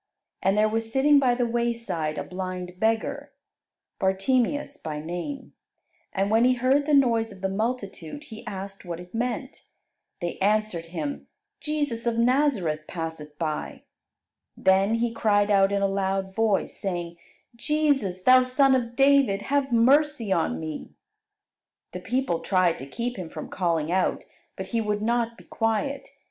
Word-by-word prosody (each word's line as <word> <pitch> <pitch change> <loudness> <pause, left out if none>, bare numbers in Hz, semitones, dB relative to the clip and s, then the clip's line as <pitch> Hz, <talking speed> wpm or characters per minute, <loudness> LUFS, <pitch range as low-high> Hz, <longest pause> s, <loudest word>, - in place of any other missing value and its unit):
And 195 +2 +2
there 215 +1 +4
was 225 +1 -2
sitting 280 +3 +5
by 250 -3 +3
the 245 0 +1
wayside 230 -10 -2
a - - -2
blind 180 -1 -6
beggar, 225 +1 -1 0.7
Bartimeus 250 +9 +1
by 155 - -5
name; 175 - -6 0.6
and 195 +1 0
when 225 +2 +4
he 255 +1 +4
heard 265 +4 +2
the 300 - +2
noise 230 -5 +3
of 195 -2 -13
the 190 - 0
multitude, 205 - -4
he 220 -6 -10
asked 195 -1 -7
what 175 -2 -6
it 180 0 -12
meant. 245 +3 -3 0.5
They 175 0 -4
answered 205 -3 +1
him, 160 -4 -5 0.3
"Jesus 290 -7 -2
of 230 -1 0
Nazareth 235 - +1
passeth 160 -3 -6
by." 155 -2 -4 0.7
Then 195 +3 +3
he 230 0 0
cried 205 -2 +2
out 195 -1 +4
in 200 0 +1
a - - +4
loud 195 0 -1
voice, 220 -2 +1
saying, 175 -3 -4 0.4
"Jesus, 270 -10 0
Thou 255 +3 +7
Son 265 +2 +3
of 240 -2 0
David, 270 -7 +4
have 275 -1 0
mercy 255 -1 +3
on 80 - +1
me." 80 -1 -7 1.0
The 180 - -6
people 245 -3 -1
tried 185 -3 +1
to 135 - -8
keep 240 - -4
him 180 -4 -6
from - - -7
calling 165 -4 0
out, 185 0 +1 0.3
but - - -6
he 230 -2 0
would 210 -1 -1
not 235 0 0
be - - -15
quiet. 225 +5 -2
215 Hz, 155 wpm, -26 LUFS, 185-250 Hz, 1.0 s, Thou